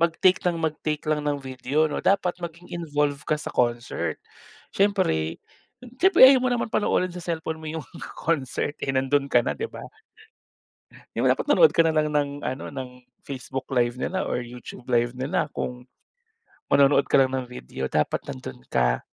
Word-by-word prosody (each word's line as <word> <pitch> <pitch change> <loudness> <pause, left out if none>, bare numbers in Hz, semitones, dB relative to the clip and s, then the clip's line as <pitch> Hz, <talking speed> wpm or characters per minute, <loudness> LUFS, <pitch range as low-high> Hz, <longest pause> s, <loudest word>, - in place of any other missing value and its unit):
mag-take 170 +2 +3
ng 175 -1 +2
mag-take 155 -1 -2
lang 155 -1 +2
ng 145 -1 0
video 135 +3 -1
'no - - -2
dapat 190 -2 +2
maging 170 0 -8
involve 150 -4 -1
ka 155 - +2
sa 150 - -6
concert. 120 -1 -1 0.6
Siyempre 190 - +1 0.6
siyempre 380 -8 +8
ayaw 260 -1 +6
mo 255 - +1
naman 245 -1 0
panoorin 185 -3 +1
sa 180 - -7
cellphone 160 -1 -3
mo 155 - -7
'yung 160 -1 -6 0.3
concert 145 -2 -1
eh - - 0
nando'n 135 +1 +1
ka 120 - +5
na - - 0
'di 450 - -3
ba. - - -10 1.4
'Di - - 0
ba - - +5
dapat - - -5
nanood 480 - +6
ka - - -1
na 160 - +1
lang 155 0 +2
ng 145 -1 +1
ano 130 +2 -3
ng 130 -2 -5 0.3
Facebook 130 -1 -6
live 120 -2 +2
nila 185 +6 -2
or 125 - -1
YouTube 120 +1 -10
live 120 +1 +2
nila 140 +4 -1
kung, 125 0 -5 0.9
manonood 140 0 +5
ka - - +5
lang 130 -1 +2
ng 130 - -2
video. 65 - -7
Dapat 75 0 0
nando'n 65 -1 -9
ka. - - +1
145 Hz, 175 wpm, -25 LUFS, 125-170 Hz, 1.4 s, siyempre